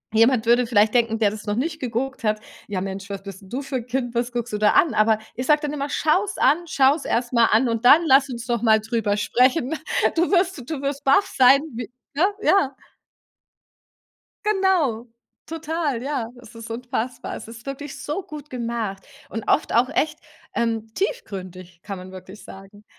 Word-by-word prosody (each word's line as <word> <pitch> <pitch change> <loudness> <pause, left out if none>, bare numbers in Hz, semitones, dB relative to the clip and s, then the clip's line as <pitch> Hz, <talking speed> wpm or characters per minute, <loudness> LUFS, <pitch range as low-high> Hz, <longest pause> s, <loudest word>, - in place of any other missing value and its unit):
Jemand 230 0 +4
würde 240 +1 +4
vielleicht 215 -1 +3
denken, 230 -2 +2
der 210 -2 +2
das 215 0 -8
noch 205 - 0
nicht 310 +6 -2
geguckt 255 +1 -3
hat: 215 0 +1 0.3
„Ja 190 -3 -3
Mensch, 195 +1 -6
was 195 -1 -6
bist 195 0 -10
du 255 +8 -4
für 270 -1 -3
'n 240 0 -7
Kind? 245 -1 -2
Was 240 +1 0
guckst 240 -1 -3
du - - 0
da 210 - +4
an?“ 325 - +4
Aber 215 0 +3 0.2
ich 255 +2 -3
sage 300 -1 +4
dann 295 0 -3
immer: 285 0 -3
„Schau's 385 +8 +1
an! 330 +4 +3
Schau's 280 +1 +3
erst 240 +1 -1
mal 235 -1 +5
an 235 +3 +3
und 230 +1 -2
dann 310 +6 +8
lass 270 +1 +5
uns 240 -1 -6
doch 235 -2 -1
mal 220 -2 +5
drüber 220 -2 -1
sprechen. 255 +6 +2 0.4
Du 345 +3 +1
wirst 365 -2 +2
du 305 -4 -3
wirst 280 0 -3
baff 280 +9 +4
sein“, 265 +2 +7
w 235 -2 -5 0.3
ne? 325 - +4 0.2
Ja. 285 -9 +3 1.7
Genau, 370 - +1 0.4
total, 320 -5 -3
ja, 270 -4 -2
es 225 -1 -15
ist 230 0 -9
unfassbar. 245 +1 -4
Es - - -9
ist 230 +1 -11
wirklich 275 +1 -7
so 325 +7 -3
gut 300 -1 -10
gemacht 230 -6 -4 0.2
und 225 +2 -5
oft - - +2
auch 240 +3 +3
echt, 300 +2 -1 0.4
ähm, 225 -1 -1
tiefgründig, 185 - -5
kann 200 -2 -6
man 185 +1 -10
wirklich 185 +2 -11
sagen. 195 +2 -13
240 Hz, 190 wpm, -23 LUFS, 220-280 Hz, 1.7 s, dann